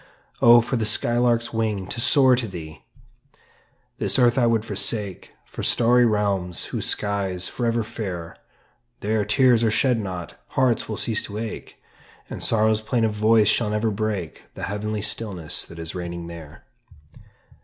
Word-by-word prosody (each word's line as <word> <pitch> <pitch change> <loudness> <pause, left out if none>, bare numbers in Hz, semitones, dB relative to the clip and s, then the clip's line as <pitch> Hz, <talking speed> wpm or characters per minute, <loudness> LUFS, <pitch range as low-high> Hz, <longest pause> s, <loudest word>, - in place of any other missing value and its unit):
Oh, 120 0 +8
for 120 +2 -2
the 110 - -1
sky 120 +2 +1
lark's 120 -1 +1
wing 110 -4 -1
to 115 +5 -4
soar 130 -1 +5
to 120 -2 -2
thee! 80 -5 -9 1.2
This - - +1
earth 120 -2 +4
I 125 -3 +3
would 115 -2 +1
forsake 100 -2 -1 0.2
For - - -8
starry 120 +1 +4
realms 100 -5 0
whose - - -1
sky's 95 -3 -1
forever 115 -2 -1
fair; 90 -7 -6 0.7
There, 105 +1 0
tears 120 +2 +3
are 115 - +3
shed 125 +2 +2
not, 90 -4 -6 0.2
hearts 125 -5 +2
will 110 - -3
cease 110 -2 +1
to 105 - -7
ache, 110 0 -7 0.5
And - - -6
sorrow's 110 -1 +2
plaintive 110 -1 0
voice 110 0 +3
shall 110 +1 +2
never 105 +1 0
break 100 -6 -4
The - - -8
heavenly 105 +1 -3
stillness 105 -7 -3
that 85 - -12
is 80 0 -5
reigning 85 -1 -6
there. 85 -3 -11
110 Hz, 155 wpm, -23 LUFS, 95-115 Hz, 1.2 s, Oh